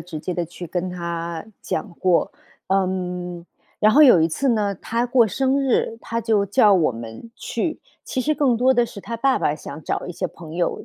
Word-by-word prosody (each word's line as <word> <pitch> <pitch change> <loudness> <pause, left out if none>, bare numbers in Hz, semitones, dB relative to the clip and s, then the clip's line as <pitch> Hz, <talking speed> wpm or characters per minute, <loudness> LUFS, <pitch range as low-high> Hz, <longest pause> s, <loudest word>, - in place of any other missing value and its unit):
直 160 -4 -7
接 180 - -3
地 175 0 -2
去 175 +1 -9
跟 180 +2 -2
她 170 -2 -4 0.2
讲 205 - -4
过， 180 -2 +2 0.4
嗯， 180 -2 -2 0.4
然 215 0 +5
后 290 - +6
有 240 - +7
一 160 - +3
次 270 - -1
呢， 210 -3 +1
她 230 +6 -2
过 245 -1 +4
生 265 +5 +1
日， 245 -4 0
她 230 0 -3
就 220 -3 +1
叫 210 +1 +5
我 170 -8 +3
们 115 - -9
去。 310 +8 -3 0.2
其 260 - -2
实 300 +5 +1
更 260 -6 +2
多 255 +2 +4
的 240 -2 +2
是 210 - -10
她 230 +3 -5
爸 265 +3 +2
爸 - - +1
想 150 0 -8
找 - - -3
一 180 - -5
些 180 +1 -3
朋 160 -1 -11
友， 175 0 -1
190 Hz, 220 characters per minute, -22 LUFS, 170-235 Hz, 0.4 s, 有